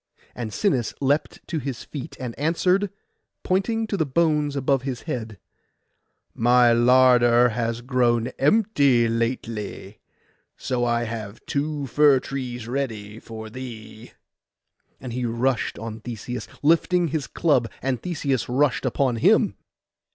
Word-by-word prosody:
And 115 -3 -5
Sinis 130 - 0
leapt 140 +2 -1
to 165 - -2
his 135 -3 -5
feet, 140 -4 -8
and 125 -3 -5
answered, 180 +6 +1 0.5
pointing 225 +5 0
to 215 - -3
the 160 - +2
bones 150 0 +1
above 135 -1 +1
his 130 -3 -5
head, 110 -4 -5 1.0
'My 120 0 +4
larder 120 0 +5
has 115 0 -2
grown 120 -2 +1
empty 140 - +3
lately, 115 -3 -3 0.6
so 125 -1 -2
I 120 0 +1
have 110 -2 -6
two 145 0 -2
fir 140 +1 +4
trees 125 -4 -5
ready 110 -5 -4
for 110 -1 -9
thee.' 115 -2 -9 0.9
And 125 -3 -7
he 125 +1 -2
rushed 120 +2 0
on 110 0 -6
Theseus, 120 +2 -6 0.2
lifting 170 +2 +3
his 145 -4 -2
club, 135 -9 +1
and 130 -3 -2
Theseus 145 -9 -2
rushed 135 +1 +1
upon 130 -1 0
him. - - +3
125 Hz, 130 wpm, -24 LUFS, 115-145 Hz, 1.0 s, larder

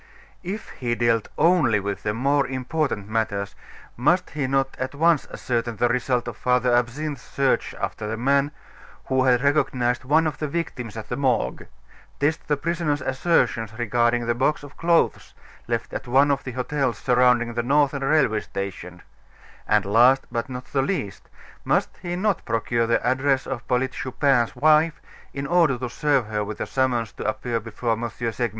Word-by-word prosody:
If 195 +5 -6
he 120 -2 -3
dealt 115 -2 +1
only 155 -10 +4
with 100 0 -4
the 105 0 -2
more 140 +3 +2
important 130 -4 -2
matters, 100 -3 -2 0.4
must 170 +9 +1
he 145 -3 -2
not 135 0 0
at 130 +2 -3
once 165 0 +3
ascertain 120 -1 -2
the 120 +3 +1
result 125 -1 0
of 120 - -6
Father 125 0 +2
Absinthe's 125 +4 -1
search 135 +1 0
after 105 - -4
the 110 +1 -3
man 140 +4 +2 0.6
who 130 0 +1
had 125 0 +3
recognized 130 -4 +1
one 155 +5 +3
of 155 - -2
the 150 - -2
victims 130 -8 -4
at 110 - -7
the - - -2
Morgue; 130 -3 0 0.5
test 145 +3 0
the 145 - +1
prisoner's 160 -2 -1
assertions 125 -6 0
regarding 120 0 +1
the 120 - +1
box 135 +5 0
of 145 0 -12
clothes 170 0 +1 0.3
left - - -2
at - - -5
one 135 +4 +4
of 140 -1 -1
the 130 - -5
hotels 130 -2 -1
surrounding 125 -1 +3
the 120 - 0
Northern 140 +2 +2
Railway 135 -7 +3
Station; 90 -3 -7 0.6
and 105 -1 +3
last, 120 +6 +4
but 120 +1 -3
not 125 0 -6
the 135 - 0
least, 135 - -3 0.3
must - - 0
he 175 0 -3
not 195 +1 0
procure 115 0 0
the 115 0 +1
address 130 +1 +1
of 125 -4 -5
Polyte 130 +1 +1
Chupin's 130 -2 0
wife, 155 +4 +3 0.3
in 140 0 -5
order 165 -4 +3
to 125 -1 -5
serve 140 -3 +1
her 105 0 -2
with 105 +1 -6
the - - -3
summons 125 -4 0
to - - -8
appear 115 +2 -2
before 115 +1 -3
M. 115 +1 -1
Segmuller? 115 +1 -2
125 Hz, 175 wpm, -24 LUFS, 115-145 Hz, 0.6 s, only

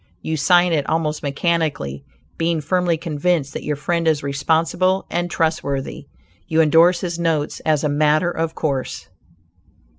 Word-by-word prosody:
You 160 - -2
sign 175 +4 +3
it 145 -3 0
almost 155 -1 -1
mechanically. 145 - -1 0.4
Being 165 0 +1
firmly 170 +2 0
convinced 155 -2 -1
that - - -5
your 150 - -2
friend 165 +3 -1
is 155 -3 +2
responsible 165 +6 +1
and 175 0 -1
trustworthy; 155 -5 -2 0.4
you 160 - +1
indorse 165 +3 +5
his 175 -2 -3
notes 160 -3 -1
as 155 -1 +2
a - - +2
"matter 150 +3 +2
of 165 -1 -3
course." 140 -4 -3
160 Hz, 145 wpm, -20 LUFS, 145-170 Hz, 0.4 s, indorse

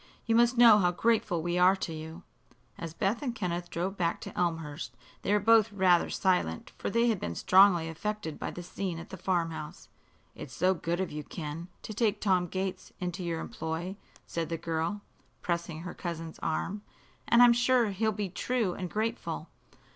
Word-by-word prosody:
You 230 - +1
must 240 +2 +4
know 230 -3 +8
how 180 -3 +3
grateful 180 -3 +1
we 175 +1 0
are 185 +2 +6
to 175 -3 -4
you." 160 +3 -8 0.5
As 165 -1 -6
Beth 200 +6 0
and 250 -5 -3
Kenneth 175 -3 -3
drove 185 +4 -3
back 170 -1 0
to - - -8
Elmhurst 165 -3 -2 0.2
they - - -1
were 210 - +4
both 225 +1 +5
rather 185 -3 +3
silent, 180 - 0
for - - -2
they 235 +3 +3
had 220 -5 +1
been 85 - -4
strongly 185 - +5
affected 165 0 -4
by - - -3
the 175 - -7
scene 180 0 -4
at 165 - -9
the - - -5
farm 175 -2 0
house. 155 -1 -8 0.4
"It's 130 -3 -9
so 185 +2 +3
good 170 0 -2
of 190 - -2
you, 150 0 -5
Ken, 160 +2 -6 0.2
to 215 - -6
take 215 -1 +1
Tom 185 -3 +2
Gates 185 +1 -4
into 180 -1 -3
your 170 -1 -2
employ," 165 +4 -4 0.3
said 165 -1 -3
the 165 - -2
girl, 165 +5 -2 0.4
pressing 170 -2 -2
her 175 - -6
cousin's 165 -2 -6
arm. 190 +6 -2 0.5
"And 235 +1 +7
I'm 240 -1 +8
sure 240 -2 +3
he'll 220 +3 0
be 205 -2 -3
true 225 0 -1
and 180 -1 -5
grateful." 225 +4 -3
180 Hz, 190 wpm, -30 LUFS, 165-210 Hz, 0.5 s, know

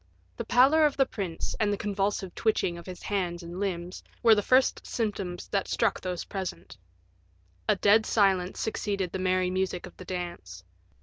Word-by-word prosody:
The - - -4
pallor 275 +6 +5
of 290 - -5
the 270 - +4
prince, 190 -9 -4
and 210 -2 +2
the 205 - 0
convulsive 200 -2 -2
twitching 215 -5 0
of 170 +1 -10
his 180 -1 -8
hands 180 -4 -2
and 170 +2 -7
limbs, 180 -2 -3 0.2
were 230 -1 +8
the 210 - +3
first 255 +5 +3
symptoms 200 -6 -3
that 195 -1 0
struck 225 -4 0
those 180 -2 -4
present. 190 - -6 0.9
A - - +5
dead 215 +2 +4
silence 190 -4 +2
succeeded 200 -4 -2
the 190 - -4
merry 185 0 +1
music 185 -1 -1
of - - -12
the 185 - -10
dance. 170 - -6
190 Hz, 175 wpm, -28 LUFS, 180-210 Hz, 0.9 s, were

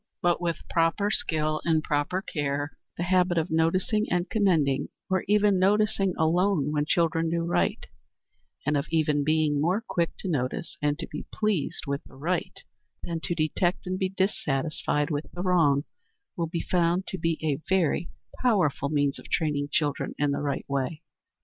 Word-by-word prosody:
But 175 0 +1
with 170 -1 -3
proper 170 +5 +1
skill 155 -4 0
and 160 -2 +2
proper 150 +6 0
care 145 -3 -2 0.2
the 175 - -1
habit 180 -1 +2
of 165 +1 0
noticing 185 +7 +2
and 175 +1 +1
commending, 165 -11 +2 0.2
or 185 -1 +2
even 205 -1 +4
noticing 200 0 +2
alone, 165 -2 +2
when 150 -1 0
children 165 0 +2
do 170 0 0
right, 170 - 0 0.8
and 150 - +2
of 140 - 0
even 150 -2 +2
being 155 -1 +2
more 180 +6 +2
quick 170 -1 0
to - - -4
notice 140 -1 -2
and 145 0 +1
to - - -4
be 150 - -7
pleased 210 -8 -1
with 140 0 -3
the - - -16
right 170 +6 -3 0.4
than 170 -1 -3
to 175 - -1
detect 170 +3 0
and 185 0 -2
be 190 - +1
dissatisfied 155 -5 -1
with 150 +1 -2
the 175 - -4
wrong, 160 -7 +3 0.5
will 170 -1 -1
be 165 0 -3
found 175 +1 +1
to 190 - -5
be 165 0 0
a 150 -1 0
very 175 -2 +1 0.3
powerful 180 - +2
means 145 -2 +1
of - - -13
training 145 -3 0
children 145 -2 0
in 145 0 +1
the 140 - -1
right 140 -2 -2
way. 140 +4 -2
165 Hz, 170 wpm, -27 LUFS, 145-180 Hz, 0.8 s, even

